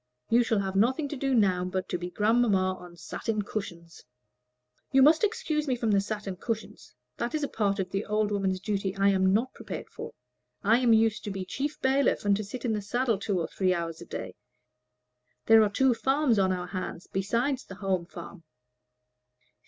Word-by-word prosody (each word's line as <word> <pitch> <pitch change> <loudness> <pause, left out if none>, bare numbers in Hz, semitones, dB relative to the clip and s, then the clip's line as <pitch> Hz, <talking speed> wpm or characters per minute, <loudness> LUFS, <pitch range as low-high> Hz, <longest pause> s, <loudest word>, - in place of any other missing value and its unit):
You 235 +1 +6
shall 225 -1 +1
have 195 -1 -3
nothing 260 +9 +2
to 295 - -4
do 270 -1 0
now 190 -5 +3
but 185 0 -3
to - - -1
be 175 0 -4
grandmamma 205 -2 +2
on 175 -1 -13
satin 210 +6 -3
cushions." 170 -6 -7 0.9
"You 270 -1 +6
must 310 +5 +5
excuse 310 -8 0
me 255 - +1
from 230 -2 0
the 200 -1 +4
satin 205 -2 -5
cushions. 220 - -5 0.2
That 240 +6 -2
is 305 - -1
a - - +1
part 200 -5 0
of 185 -2 -3
the 195 +1 -1
old 210 0 0
woman's 190 -2 0
duty 195 -1 -2
I 195 0 +3
am 190 -1 +3
not 235 +6 +1
prepared - - -7
for. - - -8 0.5
I 225 +4 +4
am 245 -2 +3
used 225 -1 +3
to - - -3
be 195 -1 -4
chief 285 +9 -4
bailiff, 265 -3 +2
and 200 0 +4
to 215 - -3
sit 245 +6 -7
in 230 - +1
the 210 - -1
saddle 235 +1 0
two 200 -2 -1
or 165 - -2
three 185 -2 0
hours 165 -1 -4
every - - -11
day. - - -6 1.1
There 225 0 +7
are 210 - +3
two 260 +5 +3
farms 265 -2 +2
on 190 -1 +3
our 180 -1 -2
hands 185 -2 -5
besides 235 +8 -1
the 195 - -10
Home 185 -2 -1
Farm." 170 -1 -10
210 Hz, 200 wpm, -28 LUFS, 190-245 Hz, 1.1 s, There